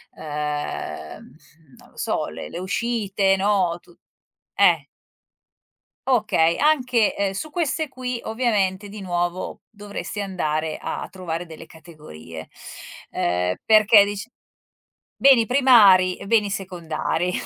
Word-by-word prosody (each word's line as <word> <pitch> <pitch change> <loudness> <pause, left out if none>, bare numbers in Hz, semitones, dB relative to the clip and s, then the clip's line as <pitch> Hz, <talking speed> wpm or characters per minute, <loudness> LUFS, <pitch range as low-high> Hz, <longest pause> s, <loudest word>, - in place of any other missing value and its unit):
ehm, 150 -2 -5 0.4
non - - -19
lo - - -27
so, - - -2
le 80 +1 -8
le 170 - -7
uscite, 200 -1 0
no, 190 -4 +1
tut 175 - -22 0.6
eh. - - +4 1.2
Okay, 210 -9 +2
anche, 250 -7 +2
ehm, 200 -1 0
su 310 +11 -5
queste 315 -1 -1
qui 250 -2 -5
ovviamente 205 -4 -1
di 210 +1 -9
nuovo 175 -1 -3
dovresti 205 0 -7
andare 160 -5 -2
a - - -5
a - - -7
trovare 175 -2 -5
delle 165 0 -11
categorie, 150 - -12 0.6
ehm, 90 +1 -1
perché 215 -1 +6
dic 205 +2 -4 0.9
beni 260 -5 +5
primari 210 -9 +5
e - - -10
beni 210 -2 +2
secondari. 180 -2 -3
195 Hz, 115 wpm, -22 LUFS, 165-225 Hz, 1.2 s, perché